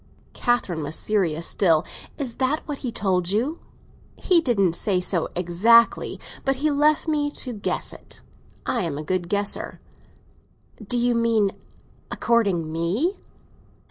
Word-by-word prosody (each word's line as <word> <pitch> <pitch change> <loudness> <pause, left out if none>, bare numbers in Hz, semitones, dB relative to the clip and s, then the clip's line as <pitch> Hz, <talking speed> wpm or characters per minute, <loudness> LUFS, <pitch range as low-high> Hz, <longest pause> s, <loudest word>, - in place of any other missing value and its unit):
Catherine 235 -10 0
was 150 +2 -2
serious 170 -6 0
still. 165 -6 +2 0.3
"Is 260 -6 -5
that 275 +5 -1
what 290 -2 -4
he 250 - -4
told 185 -5 0
you!" 245 - -1 0.6
"He 350 -3 +3
didn't 200 - +2
say 190 -1 +1
so 180 -2 0
exactly. 190 +7 +3 0.2
But 270 0 +1
he 300 +3 0
left 300 +2 +2
me 295 -2 +1
to 255 -3 -2
guess 205 - -3
it. - - -11 0.5
I'm 165 -6 -1
a 150 - -5
good 175 +1 -2
guesser." 205 +1 -1 1.0
"Do 245 +4 0
you 240 0 +2
mean 230 -4 +2 0.6
a - - -5
courting 195 -9 +1
me?" 190 - -1
215 Hz, 140 wpm, -23 LUFS, 175-260 Hz, 1.0 s, He